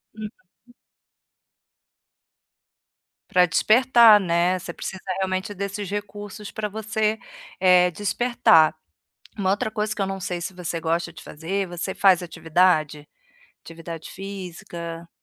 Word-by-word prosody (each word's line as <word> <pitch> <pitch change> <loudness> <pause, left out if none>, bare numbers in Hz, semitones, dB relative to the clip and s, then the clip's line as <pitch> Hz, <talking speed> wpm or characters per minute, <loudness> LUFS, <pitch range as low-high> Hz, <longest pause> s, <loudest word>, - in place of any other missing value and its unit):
Uhum. 215 -1 -6 3.0
Para 180 0 +5
despertar, 225 +5 +6
né. 175 0 +1
Você 180 - -7
precisa 190 -1 -7 0.2
realmente 190 +1 -2
desses 200 0 -5
recursos 205 0 -6
pra 215 -1 -3
você, 215 +1 -1 0.4
eh, 180 -1 +5
despertar. 200 -4 +3 0.6
Uma 195 -3 0
outra 205 +2 0
coisa 210 0 -2
que 200 - -2
eu - - 0
não 195 0 -4
sei 180 -1 -4
se 175 - -5
você 175 -2 -4
gosta 170 +1 -1
de 155 -1 -12
fazer, 190 +6 -3
você 175 +2 -5
faz 190 -3 +4
atividade? 160 -3 +1 0.6
Atividade 165 -1 -9
física. 175 -3 -8
185 Hz, 120 wpm, -23 LUFS, 170-205 Hz, 3.0 s, despertar